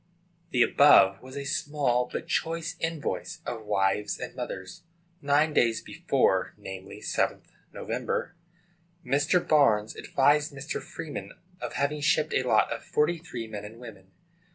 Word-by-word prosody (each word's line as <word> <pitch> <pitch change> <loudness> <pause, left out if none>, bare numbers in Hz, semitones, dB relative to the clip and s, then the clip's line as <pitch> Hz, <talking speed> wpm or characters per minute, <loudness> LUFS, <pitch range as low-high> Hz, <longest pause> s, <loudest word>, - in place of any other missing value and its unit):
} 170 -1 -39
The 125 -7 +4
above 100 -9 +6
was 130 +2 -10
a 140 - -3
small 135 -4 0
but 165 - -5
choice 165 0 -1
invoice 165 -3 -3
of 110 -2 -5
wives 100 0 0
and - - -6
mothers. 95 - -6 0.4
Nine 145 +2 +2
days 115 -4 +3
before, - - 0
namely, 95 -1 -9
7th - - -1 0.3
Nov., - - -9 1.2
Mr. 145 +7 +2
Barnes 110 -8 +3
advised 145 +2 +2
Mr. 140 +3 -5
Freeman 160 -3 -7 0.3
of - - -4
having 145 +1 -1
shipped 145 - +2
a - - +3
lot - - +2
of - - -7
forty 160 +3 +1
three 125 -9 -6
men 105 -2 -7
and 110 +3 -10
women. 105 -6 -12
140 Hz, 145 wpm, -27 LUFS, 110-155 Hz, 1.2 s, above